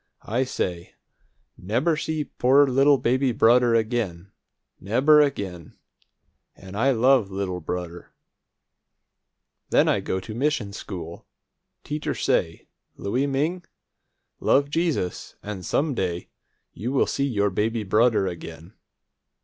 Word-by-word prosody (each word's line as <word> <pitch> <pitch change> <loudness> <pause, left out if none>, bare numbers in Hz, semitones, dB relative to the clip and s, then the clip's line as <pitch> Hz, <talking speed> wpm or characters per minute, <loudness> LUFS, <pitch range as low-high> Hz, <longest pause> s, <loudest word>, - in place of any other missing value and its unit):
I 125 +5 0
say, 90 -8 -4 0.6
'Never 125 - 0
see 155 0 -2
poor 140 +1 +3
little 135 +2 +4
baby 130 +1 +1
brudder 120 +1 +4
again, 110 -6 -2 0.5
never 135 +10 +4
again!' 100 - -3 0.8
An' 95 0 -12
I 120 +7 +2
love 125 -3 +3
little 95 -2 -3
brudder. 85 +1 -6 1.6
Then - - +4
I - - +2
go 95 - -2
mission 120 -3 -1
school. 85 -4 -8 0.6
Teacher 150 0 -3
say, 80 0 -1 0.3
'Louie 125 +8 -1
Ming, 155 +6 -1 0.8
love 140 +1 +2
Jesus, 160 - -2
an' 105 -2 -6
some 145 - 0
day 90 -6 -3 0.4
you 130 +5 0
see 140 - -1
your 105 -5 0
baby 110 +4 -1
brudder 110 +1 +3
again.' 85 0 -8
115 Hz, 110 wpm, -24 LUFS, 95-135 Hz, 1.6 s, little